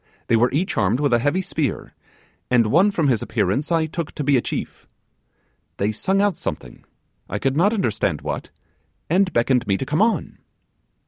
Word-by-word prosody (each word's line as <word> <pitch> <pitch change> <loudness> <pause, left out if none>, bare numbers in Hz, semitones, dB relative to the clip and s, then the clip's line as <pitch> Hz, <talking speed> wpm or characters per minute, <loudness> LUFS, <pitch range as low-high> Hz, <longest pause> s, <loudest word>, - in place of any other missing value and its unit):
They 115 - +4
were 120 +2 +3
each 170 +7 -1
armed 110 +3 +2
with 145 -4 +1
a 120 - +4
heavy 145 +10 0
spear, 150 -6 -3 0.6
and 120 -2 +4
one 170 - +4
from 165 -7 0
his 120 -5 +2
appearance 130 - -1
I 165 -1 +2
took 160 0 -5
to 150 - -4
be 140 0 +3
a 125 - +3
chief. - - -6 0.9
They 100 +2 0
sung 190 - 0
out 205 -5 +1
something, - - -6 0.5
I 105 - -2
could 135 +5 -1
not 185 +7 +3
understand 110 - -1
what, - - -4 0.6
and 185 +1 +3
beckoned 125 +1 +1
me 100 -1 +2
to 135 - -4
come 150 +7 0
on. 225 +1 0
140 Hz, 185 wpm, -22 LUFS, 115-170 Hz, 0.9 s, They